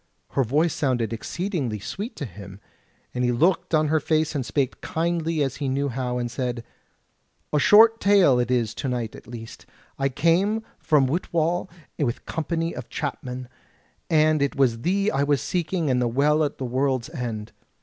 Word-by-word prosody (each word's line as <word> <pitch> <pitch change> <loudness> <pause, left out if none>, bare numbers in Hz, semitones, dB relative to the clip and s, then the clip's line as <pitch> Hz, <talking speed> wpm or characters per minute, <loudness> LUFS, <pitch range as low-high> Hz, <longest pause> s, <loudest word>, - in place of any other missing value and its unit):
Her 135 - +2
voice 150 +7 +1
sounded 120 -6 0
exceeding 140 - -3
sweet 210 - -6
to 145 - -4
him, 100 -4 -10 0.5
and 125 - -1
he 125 - +2
looked 170 +6 +2
on 155 -1 +2
her 160 +1 +3
face 155 +1 +1
and 140 -4 -1
spake 135 +1 0
as - - -42
kindly 165 -1 0
as 135 -2 -3
he 140 -3 -2
knew 140 +2 0
how, 125 -1 -2
and 120 -1 -2
said: 125 -2 -3 0.9
"A 150 - +4
short 225 +6 +7
tale 195 -11 +5
it 120 - 0
is 120 -4 +1
to 135 - -3
night 120 -3 -3
at - - -13
least: 115 -1 -10 0.3
I 135 0 +2
came 175 +10 +2 0.2
from 150 -4 +3
Whitwall 170 +4 0 0.3
with 125 -6 0
a - - -24
Company 165 +1 -2
of - - -7
Chapmen, 130 -3 -4 0.6
and 155 -1 +4
it 140 - 0
was 120 -4 +2
thee 195 - +1
I 135 - 0
was 145 -1 +2
seeking 170 -3 -1
and 125 -1 +2
the 120 - +2
Well 145 +6 +2
at 145 - -2
the 130 - -4
World's 130 +2 0
End. 115 -7 -5
140 Hz, 185 wpm, -24 LUFS, 125-165 Hz, 0.9 s, short